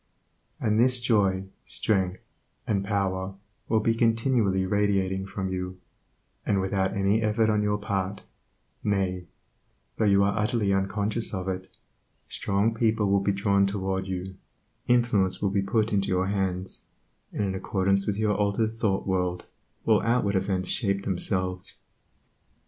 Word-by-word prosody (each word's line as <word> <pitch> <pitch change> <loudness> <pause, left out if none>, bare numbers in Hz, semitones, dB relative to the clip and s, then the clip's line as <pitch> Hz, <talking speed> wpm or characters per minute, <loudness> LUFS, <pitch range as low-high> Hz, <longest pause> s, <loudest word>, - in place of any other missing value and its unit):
And 105 0 +1
this 125 +1 +5
joy, 100 -6 +2 0.2
strength, 95 -3 0 0.4
and 100 -3 0
power 95 -2 -1 0.3
will 110 -1 +3
be 115 +1 +2
continually 115 -4 +2
radiating 95 -1 0
from 95 -1 -3
you, 90 0 -4 0.6
and 100 -2 +1
without 95 0 0
any 100 +3 +2
effort 110 0 +2
on 105 -1 +2
your 105 0 +1
part, 100 -1 -3 0.6
nay, 95 -3 -1 0.7
though 110 - +2
you 100 -1 +5
are 100 0 +1
utterly 110 -2 +1
unconscious 100 +3 -1
of 95 0 -4
it, 95 0 -4 0.6
strong 100 +3 0
people 110 -3 +1
will 100 - +4
be 100 +1 +1
drawn 100 0 +2
toward 95 -1 -2
you, 95 0 -4 0.5
influence 115 -7 +2
will 100 - 0
be 100 0 +1
put 110 +2 0
into 100 -1 +1
your 95 0 +1
hands, 95 -2 -2 0.5
and - - -2
in 95 -1 -1
accordance 100 +1 0
with 100 -1 0
your 105 -1 +2
altered 105 +2 +1
thought 110 -4 -1
world 90 -2 -1 0.4
will - - +4
outward 115 -4 +1
events 95 -1 0
shape 100 -4 0
themselves. 90 -1 -1
100 Hz, 145 wpm, -27 LUFS, 95-105 Hz, 0.7 s, this